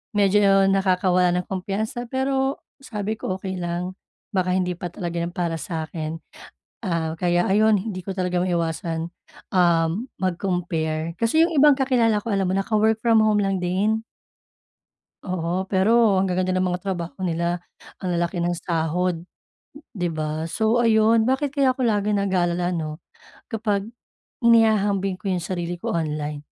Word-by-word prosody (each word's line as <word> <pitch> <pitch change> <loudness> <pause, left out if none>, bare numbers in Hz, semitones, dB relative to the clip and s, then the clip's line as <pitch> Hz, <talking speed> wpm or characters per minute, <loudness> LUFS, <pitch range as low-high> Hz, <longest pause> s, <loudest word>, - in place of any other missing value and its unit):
medyo 195 -1 +4
nakakawala 185 -2 +2
ng 180 - -2
kumpiyansa, 210 +5 -3
pero 265 +1 0 0.2
sabi 215 -3 -4
ko 185 - -3
okey 190 0 -5
lang 175 +2 -3 0.4
baka 185 -1 +1
hindi 180 -1 0
pa 175 - -5
talaga 170 -2 -4
'yan 170 +1 -3
para 170 -2 -1
sa 160 +1 -4
akin. 160 0 -5 0.6
Ah, 165 -4 -1
kaya 175 +1 +1
ayon, 215 +2 +4
hindi 195 -2 -5
ko 195 - -6
talaga 180 -1 0
maiwasan, 170 -1 -2 0.4
um, 175 +5 +2
mag-compare 170 -4 -1
kasi 275 +9 +3
yung 340 - +1
ibang 295 -2 +6
kakilala 235 -6 +2
ko, 230 - -3
alam 195 -2 +1
mo 190 - 0
naka-work 215 +2 +1
from 230 -2 +5
home 215 -1 +3
lang 195 -1 0
din. 200 +5 +1 1.3
Oo, 180 0 -2
pero 200 +1 +3
ang 190 - 0
gaganda 185 +1 0
ng 185 0 +1
mga 180 0 -3
trabaho 175 -3 -4
nila, 170 +1 0 0.4
ang 180 -2 -3
lalaki 175 +1 -1
ng 175 +1 0
sahod, 170 +1 -1 0.7
di 180 -5 -2
ba? 155 0 -3
So 220 +6 +1
ayun, 225 0 +4
bakit 270 +1 +1
kaya 270 -3 +2
ako 260 - -2
nag-alala 195 -5 +1
ano, 155 -2 -4 0.4
kapag 210 -3 -1 0.6
inihahambing 210 -4 +3
ko 200 -3 -3
yung 180 -2 -1
sarili 175 -1 -3
ko - - -3
online? 150 -2 -3
185 Hz, 150 wpm, -23 LUFS, 175-215 Hz, 1.3 s, ibang